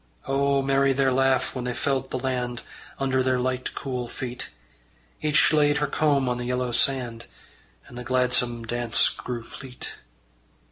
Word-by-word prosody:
O 140 0 +2
merry 135 0 +3
their 135 0 +2
laugh 130 0 +2
when 125 - -4
they 125 -1 -3
felt 135 -1 -1
the - - -2
land 125 -2 -2 0.3
Under 135 -1 +1
their 130 0 +2
light 130 0 -2
cool 125 -3 -3
feet! 125 +1 -5 0.7
Each 155 +1 +4
laid 150 -1 +4
her 150 - +1
comb 145 -2 +2
on 125 0 -1
the 120 - -3
yellow 125 0 -1
sand, 120 -2 0 0.6
And - - -14
the - - -6
gladsome 125 -2 +1
dance 115 -4 +2
grew 120 -2 -5
fleet. 130 +1 -8
130 Hz, 155 wpm, -25 LUFS, 125-135 Hz, 0.7 s, Each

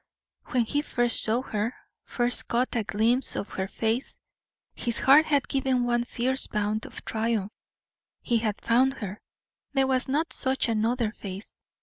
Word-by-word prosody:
When 245 -2 +1
he 290 +6 0
first 240 -5 +3
saw 230 +4 +2
her 215 0 -3 0.3
first 240 0 0
caught 245 +2 0
a 230 - +2
glimpse 225 +5 +1
of 200 - -3
her 190 0 -3
face 225 +5 -2 0.6
his 235 -2 -3
heart 290 +4 +6
had 285 -3 +1
given 265 -2 0
one 240 0 0
fierce 260 +2 +2
bound 210 +1 -2
of - - -11
triumph. 220 -2 -1 0.7
He 235 -1 +1
had 215 -2 -1
found 255 +3 +3
her; 205 -4 -7 0.5
there 270 -1 +3
was 260 0 +1
not 300 +5 -1
such 265 -1 0
another 225 0 0
face. 195 -1 -9
240 Hz, 155 wpm, -26 LUFS, 220-260 Hz, 0.7 s, heart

